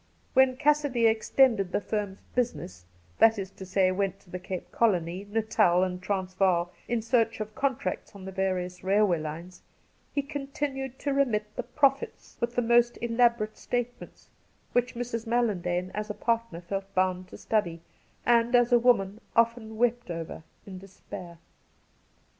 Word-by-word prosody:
When 260 -1 +4
Cassidy 290 -4 +2
extended 220 -2 +3
the - - +1
firm's 205 -2 -3
' - - -31
business 95 - -2
' 90 -1 -32
— 85 - -32
that 225 0 +6
is 195 -1 -5
to 190 - -10
say, 185 0 +3
went 195 0 -1
to 180 - -21
the 180 - -4
Cape 180 0 -6
Colony, 185 -3 0
Natal, 205 -5 +3
and 180 -1 -3
Transvaal, 185 -2 0 0.2
in 235 -2 -1
search 230 -1 +1
of 215 0 -5
contracts 240 -9 -2
on 190 -2 -10
the 190 - -6
various 185 -1 -2
railway 195 -2 +3
lines 165 +4 -7 0.3
— - - -38
he 285 - +1
continued 275 -2 -4
to 285 0 -2
remit 215 -7 0
the - - -2
' 245 - -29
profits 275 -1 +1
' - - -32
with 235 0 -1
the 245 - +2
most 240 +1 +3
elaborate 235 -2 +1
statements, 245 0 -5 0.4
which 245 0 0
Mrs. 235 -1 -4
Mallandane, 185 -6 0
as 210 +1 -4
a 210 - -4
partner, 230 -6 -1
felt 195 +2 -5
bound 185 0 +1
to - - -11
study, 170 -7 -1 0.4
and, 240 0 +4
as 245 0 +4
a 240 - +6
woman,' 220 -4 +2
often 230 -1 +1
wept 240 -2 +1
over 165 -2 -5 0.2
in 190 -2 -8
despair. 180 -2 -10
215 Hz, 170 wpm, -28 LUFS, 185-240 Hz, 0.4 s, that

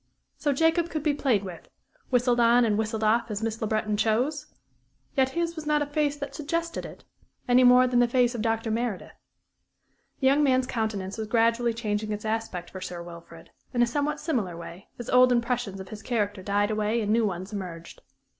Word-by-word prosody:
So 290 - 0
Jacob 325 +4 +2
could 310 -3 -3
be 300 -2 +2
played 255 -8 +1
with 180 -3 -9 0.4
whistled 245 -1 +2
on 235 +1 +5
and 215 -2 +1
whistled 220 0 -2
off 230 +2 +2
as 210 0 -4
Miss 225 0 -3
Le 220 - 0
Breton 215 0 0
chose? 255 +8 0 0.7
Yet 265 -2 +3
his 340 0 -1
was 315 -2 -7
not 300 -1 +2
a - - -3
face 290 0 -1
that 285 -1 -6
suggested 335 +3 -3
it, - - -13 0.4
any 250 +1 +5
more 250 0 +7
than 245 -1 +2
the 245 - +4
face 245 0 +2
of 235 - -4
Dr. 225 0 -1
Meredith. 230 -3 -3 1.1
The 265 - -1
young 275 +3 +5
man's 260 -3 +3
countenance 220 -5 -3
was 220 - -3
gradually 230 +1 +2
changing 215 -2 -2
its 210 +1 -4
aspect 220 -5 -3
for 185 - -8
Sir 175 -2 -6
Wilfrid, 170 -1 -12 0.2
in 240 - +4
a - - +5
somewhat 290 +5 -1
singular 205 - -2
way, 170 +3 -10
as 240 - -7
old 250 0 +5
impressions 235 -4 -1
of 190 - -9
his 215 -1 -8
character 205 -5 -2
died 205 +2 0
away 215 +2 0
and 210 0 0
new 225 -1 +3
ones 190 +2 -5
emerged. 175 -4 -7
230 Hz, 200 wpm, -26 LUFS, 210-260 Hz, 1.1 s, more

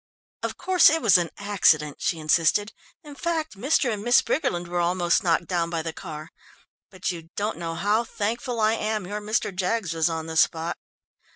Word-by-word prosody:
"Of - - -4
course 365 0 +5
it 325 +2 +1
was 205 - +5
an 170 -1 -2
accident," 160 -8 +2
she 170 - -1
insisted, 165 +7 +2 0.3
"in 295 -2 -11
fact, 320 -2 -3
Mr. 250 +2 +1
and 205 - -5
Miss 240 +1 +5
Briggerland 180 - -1
were 175 0 -2
almost 175 0 +1
knocked 170 -1 +1
down 170 -2 -1
by 165 -2 -2
the 165 0 -4
car. 155 -3 -8 0.6
But 185 -1 -3
you 165 -2 -9
don't 205 -3 -2
know 165 -1 -4
how 205 +7 +1
thankful 230 +2 -3
I 215 0 +3
am 215 -3 -2
your 205 +3 -5
Mr. 210 -2 -1
Jaggs 185 -1 -1
was 160 0 +1
on 160 -1 -4
the 160 0 -5
spot." 165 +2 +1
185 Hz, 190 wpm, -25 LUFS, 165-220 Hz, 0.6 s, course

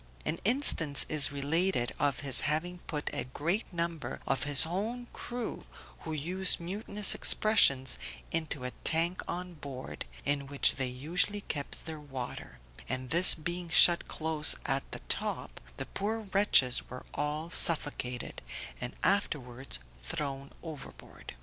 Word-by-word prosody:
An 165 - -3
instance 195 - +6
is 150 -3 +5
related 145 -2 -1
of 145 -1 -1
his 135 -4 +7
having 175 +4 -3
put 150 -2 -5
a - - -3
great 170 - -4
number 170 -3 -5
of 135 +1 -1
his 145 -2 +6
own 215 +9 -5
crew, 245 -1 -7 0.3
who 160 - -8
used 180 +5 +1
mutinous 200 +3 +3
expressions, 140 - +3 0.3
into 155 -5 -4
a 125 - -5
tank 170 +3 0
on 180 0 -6
board, 140 -4 -9 0.2
in 140 -1 -1
which 140 0 +2
they 130 -2 -1
usually 165 +11 -2
kept 145 -7 -7
their 160 -1 -7
water, 130 - -9 0.3
and 130 0 -4
this 175 +3 +6
being 170 +2 -6
shut 170 0 +7
close 155 -1 +2
at 135 0 -3
the - - -7
top, - - -2 0.2
the - - -5
poor 220 +3 -4
wretches 190 -11 +3
were 125 +1 -10
all 150 +3 -4
suffocated, 145 -8 -1 0.4
and 125 0 -6
afterwards 135 - -2 0.2
thrown 140 - -5
overboard. 155 - -11
155 Hz, 135 wpm, -29 LUFS, 135-180 Hz, 0.4 s, his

